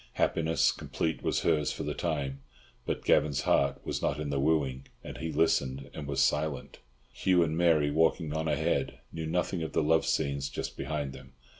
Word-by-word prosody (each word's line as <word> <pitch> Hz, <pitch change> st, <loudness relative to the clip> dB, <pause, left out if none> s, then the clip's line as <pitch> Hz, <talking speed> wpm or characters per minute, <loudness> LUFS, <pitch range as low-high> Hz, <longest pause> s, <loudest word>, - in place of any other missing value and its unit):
Happiness 80 Hz, -4 st, +2 dB
complete 80 Hz, -1 st, -3 dB
was -, -, 0 dB
hers 75 Hz, -2 st, +2 dB
for -, -, -5 dB
the -, -, -2 dB
time; 70 Hz, -5 st, -2 dB, 0.5 s
but -, -, -2 dB
Gavan's 70 Hz, -3 st, +3 dB
heart 70 Hz, +1 st, +1 dB
was -, -, -2 dB
not 75 Hz, -, 0 dB
in 75 Hz, -2 st, -3 dB
the 70 Hz, -, 0 dB
wooing, 70 Hz, -3 st, 0 dB, 0.2 s
and -, -, -8 dB
he 80 Hz, 0 st, -3 dB
listened 70 Hz, -4 st, +1 dB
and 75 Hz, -, -6 dB
was 70 Hz, -1 st, +2 dB
silent. 75 Hz, -1 st, -1 dB, 0.3 s
Hugh 90 Hz, -2 st, +3 dB
and 80 Hz, -1 st, -1 dB
Mary, 80 Hz, -4 st, +3 dB
walking 80 Hz, 0 st, +2 dB
on 80 Hz, 0 st, -1 dB
ahead, 75 Hz, -3 st, 0 dB
knew 80 Hz, -1 st, -4 dB
nothing 90 Hz, +1 st, -1 dB
of 80 Hz, -2 st, -4 dB
the -, -, +2 dB
love 80 Hz, +2 st, +3 dB
scenes 70 Hz, -1 st, 0 dB
just 70 Hz, -, -5 dB
behind 75 Hz, -3 st, -3 dB
them. 65 Hz, 0 st, -13 dB
75 Hz, 185 wpm, -30 LUFS, 70-80 Hz, 0.5 s, Gavan's